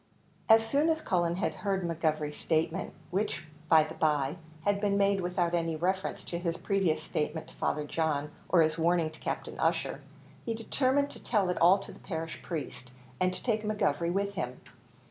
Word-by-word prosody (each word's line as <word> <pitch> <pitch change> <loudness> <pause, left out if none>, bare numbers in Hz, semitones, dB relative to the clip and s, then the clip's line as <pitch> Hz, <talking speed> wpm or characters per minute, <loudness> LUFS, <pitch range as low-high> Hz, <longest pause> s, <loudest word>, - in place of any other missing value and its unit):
As 225 0 +7
soon 285 +7 +2
as 320 -1 +2
Cullen 175 - +1
had 185 - -1
heard 195 -2 -1
McGovery's 155 -3 -1
statement 160 0 0 0.2
which, 195 -1 -1 0.3
by 160 -1 +7
the 155 +1 -7
by, 150 -1 +1 0.3
had 205 +1 +1
been 200 -1 +2
made 200 -1 +3
without 175 -1 0
any 165 -2 0
reference 185 +4 -1
to 170 - -4
his 170 -1 -2
previous 195 -5 +1
statement 155 +1 -3
to - - -16
Father 150 - 0
John, 150 -1 -1 0.2
or 170 -3 +6
his 155 +1 0
warning 165 -1 +2
to 160 - -15
Captain - - -4
Ussher - - 0 0.4
he 230 - -2
determined 265 +5 +1
to - - -11
tell 205 -6 +2
it 180 - -1
all 180 +4 +7
to 195 - -8
the - - -14
parish 165 -3 -5
priest, 145 -6 -6 0.3
and 185 0 +3
to 185 - -6
take 220 -3 +1
McGovery 175 -6 0
with 200 +2 0
him. 125 -9 -4
175 Hz, 185 wpm, -30 LUFS, 160-200 Hz, 0.4 s, As